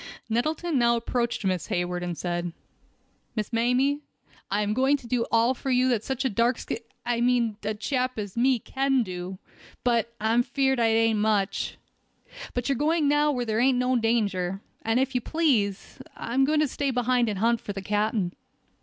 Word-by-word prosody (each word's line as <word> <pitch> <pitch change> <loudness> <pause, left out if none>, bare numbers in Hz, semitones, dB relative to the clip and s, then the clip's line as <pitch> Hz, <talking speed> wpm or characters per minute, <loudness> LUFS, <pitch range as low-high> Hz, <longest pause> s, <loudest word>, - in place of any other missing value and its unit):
Nettleton 305 +6 0
now 235 0 +4
approached 235 -2 -1
Miss 185 -3 0
Hayward, 175 0 -1
and 175 -2 -4
said: 175 -1 -3 0.8
"Miss 215 +1 -3
Mamie, 250 +5 +2 0.5
I 205 +2 +1
am 210 0 0
going 265 +4 +3
to 260 - -15
do 235 -1 0
all 230 +2 +4
for 265 - -5
you 255 0 +3
such 265 +3 -3
a - - +3
darn 235 +4 +2
sk— - - -4 0.3
I 240 -1 0
mean 240 -3 +2
such 210 - -2
a 215 - -6
chap 255 +2 -1
as 205 -3 -5
me 255 +2 +3
can 270 +2 0
do; 185 -1 -6 0.5
but, 235 -2 +1
I'm 225 +3 +3
feard 265 0 +1
that 230 - +3
ain't 225 -1 +3
much. 210 -2 0 0.8
But 245 -1 -1
you're 275 - +2
going 310 +1 +2
now 295 +1 +3
where 250 -3 -2
there 220 -1 0
ain't 255 +1 +4
no 250 +1 +1
danger, 200 -6 0 0.2
and 225 +2 +1
if 265 0 0
you 250 - 0
please, 240 - 0 0.2
I'm 245 +3 -1
a - - +6
going 305 0 +3
to 305 - +3
stay 280 +1 -2
behind 245 -1 +1
and 205 - -2
hunt 230 +3 +2
for 205 - -5
the 195 - -5
captain." 205 -2 0
235 Hz, 190 wpm, -26 LUFS, 210-260 Hz, 0.8 s, a